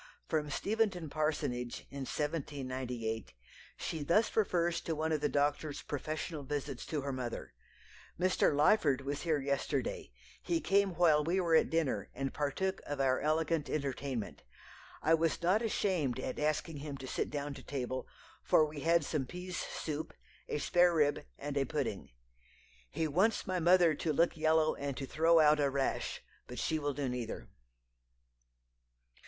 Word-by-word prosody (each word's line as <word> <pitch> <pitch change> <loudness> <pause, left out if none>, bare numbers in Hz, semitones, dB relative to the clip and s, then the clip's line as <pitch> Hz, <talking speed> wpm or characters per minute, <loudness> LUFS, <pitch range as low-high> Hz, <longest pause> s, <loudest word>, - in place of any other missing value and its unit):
From 150 -2 0
Steventon 195 -3 0
parsonage, 145 -6 -1
in 140 -1 -5
1798, 130 - -3 0.4
she 160 - -4
thus 175 +10 +2
refers 175 -5 +2
to 165 - -2
one 160 +1 -1
of 155 -2 +1
the 150 - +1
doctor's 145 +1 0
professional 155 +2 -4
visits 140 -1 -4
to 150 -3 -2
her 140 0 -3
mother. 125 - -5 0.7
"Mr. 185 0 +3
Lyford 145 -2 +4
was 140 +1 -3
here 160 -3 +1
yesterday; 140 - -2 0.3
he 170 -1 0
came 195 -1 +2
while 155 -3 +5
we 175 +5 +1
were 170 -3 +1
at - - +4
dinner, 160 -5 0
and 135 +1 -2
partook 170 +7 -1
of 145 -1 -3
our 130 -1 +3
elegant 155 +1 0
entertainment. 140 -5 -3 0.6
I 160 - +4
was 165 0 +2
not 185 +6 +3
ashamed 185 - 0
at 130 - -4
asking 155 +1 0
him 140 -1 -6
to 135 - -8
sit - - -2
down 145 -1 -3
to - - -10
table, 130 -2 -4 0.4
for 155 - +5
we 150 -1 -7
had 165 +1 +3
some 140 -4 -1
pease 180 +2 -6
soup, 155 +1 -4 0.4
a - - -1
sparerib, 160 -2 +3
and 145 -1 -5
a 140 -1 +2
pudding. - - -3 0.8
He 160 - -1
wants 190 +10 +2
my 185 -3 -1
mother 175 -1 +5
to 155 +2 -1
look 170 +4 +2
yellow 160 0 +3
and 140 -2 -4
to 140 - -3
throw 165 +4 +4
out 150 -1 +6
a 140 -1 +3
rash, 135 0 -1 0.2
but 125 - -8
she 155 +7 0
will 145 -2 -2
do 145 -2 -1
neither." 120 - -4
150 Hz, 160 wpm, -33 LUFS, 140-165 Hz, 0.8 s, out